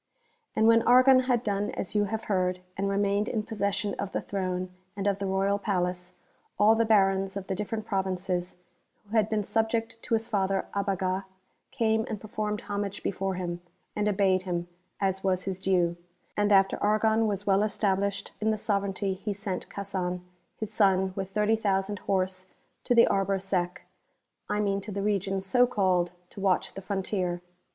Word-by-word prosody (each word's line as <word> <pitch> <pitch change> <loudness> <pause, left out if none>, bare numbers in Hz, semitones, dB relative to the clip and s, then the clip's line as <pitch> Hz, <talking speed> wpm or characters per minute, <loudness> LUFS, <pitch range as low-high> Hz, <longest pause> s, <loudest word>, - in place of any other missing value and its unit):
And 220 - +3
when 230 0 +6
Argon 255 +2 +7
had 240 -1 +2
done 205 -2 -1
as 190 - -4
you 210 -1 +2
have 220 +2 -3
heard, 180 -2 0
and 195 +1 -1
re 200 - 0
mained 200 +1 +1
in 215 - -1
possession 205 -1 -1
of 200 -1 -3
the - - 0
Throne 185 -2 -3 0.3
and 200 - -3
of 200 -1 +1
the 200 - -2
Royal 195 +1 +1
Palace, 180 -2 -2 0.4
all 210 +2 +6
the 230 0 +2
Barons 195 -2 +3
of 195 - -5
the 190 - -2
different 210 +2 -3
Provinces, 185 -3 -1 0.5
who 210 +3 -6
had 215 -1 +3
been 215 -1 0
subject 225 +1 -1
to 230 - 0
his 225 0 -1
father 195 -3 0
Abaga, 195 -1 -1 0.4
came 220 -3 +1
and 215 - -3
performed 210 0 -3
homage 200 -1 -4
before 195 0 -1
him, 175 -1 -4 0.3
and 210 0 0
obeyed 190 -2 +3
him, 175 -2 -3 0.3
as 190 -1 0
was 185 -1 +1
his 190 -1 -3
due/ 180 -3 +2 0.4
And 205 0 +2
after 195 -1 +4
Argon 220 +1 +3
was 205 -1 -2
well 195 0 +3
established 200 -1 0
in 220 - +2
the 215 - +1
sovereignty 200 -2 -1
he 205 +2 -4
sent 195 -2 -4
Casan 185 -3 -3 0.4
his 220 -1 -5
son 190 -3 +3
with 195 -1 -3
30,000 205 -2 +1
horse 185 -1 -1 0.4
to 245 - +3
the 235 - +8
Arbre 195 0 +1
Sec, 180 -2 -2 0.7
I 210 - 0
mean 200 -1 0
to 210 - -7
the 200 0 -3
region 195 -2 0
so 245 +6 +3
called, 185 -6 +1 0.2
to 200 - -8
watch 190 -2 +1
the 195 - -7
frontier. 185 -3 -2
200 Hz, 175 wpm, -28 LUFS, 190-210 Hz, 0.7 s, the